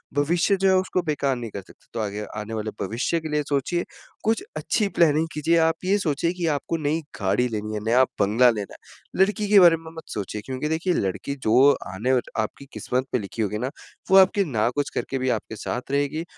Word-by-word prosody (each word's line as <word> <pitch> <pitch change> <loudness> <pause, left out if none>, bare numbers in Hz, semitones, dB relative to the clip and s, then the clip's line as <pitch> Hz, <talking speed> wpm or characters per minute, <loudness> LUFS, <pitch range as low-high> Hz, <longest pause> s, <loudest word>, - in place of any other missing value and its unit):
भविष्य 165 +7 +2
जो 195 - +4
है, 190 - +5
उसको 185 0 0
बेकार 145 -4 0
नहीं 120 -3 -6
कर 100 - -6
सकते, 95 - -20
तो 115 - -3
आगे 105 0 -3
आने 105 +1 -5
वाले 110 -1 -3
भविष्य 120 - -1
के 160 -1 -6
लिए 150 0 +1
सोचिए। 145 +5 0 0.4
कुछ 225 - +1
अच्छी 210 - 0
प्लानिंग 160 -3 +3
कीजिए। 160 +3 +2
आप 160 0 +3
ये 195 +2 +3
सोचिए 170 -1 0
कि 180 -2 -3
आपको 155 +2 -1
नई 155 +1 0 0.2
गाड़ी 100 +6 +2
लेनी 110 -2 -4
है, 105 - -2
नया 120 +3 +5 0.2
बंगला 115 +5 +5
लेना 105 -4 -3
है। - - -7
लड़की 210 +1 -1
के 205 -1 +8
बारे 170 -3 +7
में 160 0 -11
मत 160 - -7
सोचिए 105 +1 -4
क्योंकि 130 +3 -3
देखिए 165 +3 0
लड़की 100 - -2
जो 130 +6 +6 0.2
आने 120 +7 0
र - - +1 0.2
आपकी 110 +5 -3
किस्मत 130 +1 -2
पे - - +2
लिखी 105 +2 -5
होगी 105 0 -1
ना। 125 +4 -2 0.4
वो 190 - +8
आपकी 190 +1 +5
ना 115 -7 +1
कुछ 145 -1 -1
करके 135 - -2
भी 130 0 0
आपके 110 -2 -2
साथ 125 +5 -5
रहेगी 145 +3 0
140 Hz, 220 wpm, -24 LUFS, 110-165 Hz, 0.4 s, के